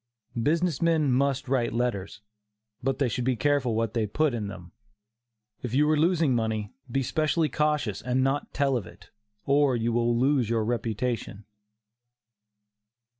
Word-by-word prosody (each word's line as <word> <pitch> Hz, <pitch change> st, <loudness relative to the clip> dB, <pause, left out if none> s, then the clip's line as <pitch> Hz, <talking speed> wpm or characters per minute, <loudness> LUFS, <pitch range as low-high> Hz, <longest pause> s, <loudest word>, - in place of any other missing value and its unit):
Business 165 Hz, +2 st, +1 dB
men 160 Hz, -4 st, +2 dB
must 135 Hz, +1 st, +1 dB
write 125 Hz, -2 st, 0 dB
letters, 115 Hz, -5 st, -2 dB, 0.6 s
but 135 Hz, +1 st, -1 dB
they 140 Hz, -, +1 dB
should 125 Hz, +1 st, -2 dB
be 130 Hz, 0 st, +1 dB
careful 130 Hz, -1 st, +1 dB
what 115 Hz, -1 st, -1 dB
they 110 Hz, -3 st, 0 dB
put 150 Hz, +6 st, +1 dB
in 110 Hz, -4 st, -3 dB
them. 90 Hz, -3 st, -9 dB, 0.9 s
If 125 Hz, 0 st, -3 dB
you 150 Hz, +2 st, +4 dB
are -, -, +4 dB
losing 160 Hz, -2 st, +2 dB
money, 110 Hz, -3 st, -2 dB, 0.2 s
be 135 Hz, +2 st, 0 dB
specially 155 Hz, +3 st, +1 dB
cautious 150 Hz, -9 st, 0 dB
and 125 Hz, +2 st, 0 dB
not 135 Hz, +2 st, -1 dB
tell 140 Hz, -1 st, +1 dB
of 100 Hz, -7 st, -6 dB
it, -, -, -16 dB, 0.3 s
or 140 Hz, -2 st, +3 dB
you 115 Hz, 0 st, 0 dB
will 120 Hz, 0 st, +2 dB
lose 130 Hz, -2 st, +2 dB
your 115 Hz, -2 st, +1 dB
reputation. 115 Hz, -2 st, -2 dB
125 Hz, 155 wpm, -27 LUFS, 115-145 Hz, 0.9 s, you